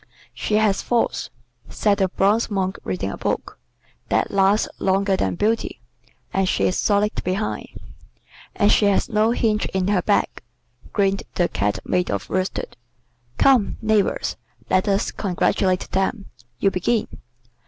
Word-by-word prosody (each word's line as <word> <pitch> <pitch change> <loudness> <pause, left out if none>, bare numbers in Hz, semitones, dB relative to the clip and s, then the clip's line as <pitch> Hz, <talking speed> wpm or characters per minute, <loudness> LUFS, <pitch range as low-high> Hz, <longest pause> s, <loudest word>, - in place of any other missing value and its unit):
"She 210 - -2
has 210 -2 +2
thoughts," 240 -1 0 0.4
said 205 -1 +1
the 190 - +3
bronze 205 +5 +1
Monk 190 -2 -2
reading 95 +1 -3
a - - -6
book. - - -3 0.5
"That - - +1
lasts 200 +2 +3
longer 195 +1 +2
than - - -1
beauty. 220 +5 -1 0.5
And 190 -1 +1
she - - 0
is 185 - +2
solid 210 0 +1
behind." 190 +4 -2 0.9
"And 205 -1 +3
she 210 - +4
has 200 +5 +2
no 215 0 +2
hinge 220 -2 +1
in 190 0 -1
her 200 -3 +2
back," - - 0 0.5
grinned 195 -1 +1
the 175 - +2
Cat 105 -6 -1
made 180 -1 0
of 100 -1 -3
worsted. 185 0 -2 0.6
"Come, 255 -7 +3
neighbors, 220 -2 0 0.3
let 185 - +2
us 195 0 +1
congratulate 185 -1 0
them. 195 +2 -1 0.3
You 195 - +2
begin." 210 +5 0
195 Hz, 145 wpm, -22 LUFS, 185-210 Hz, 0.9 s, she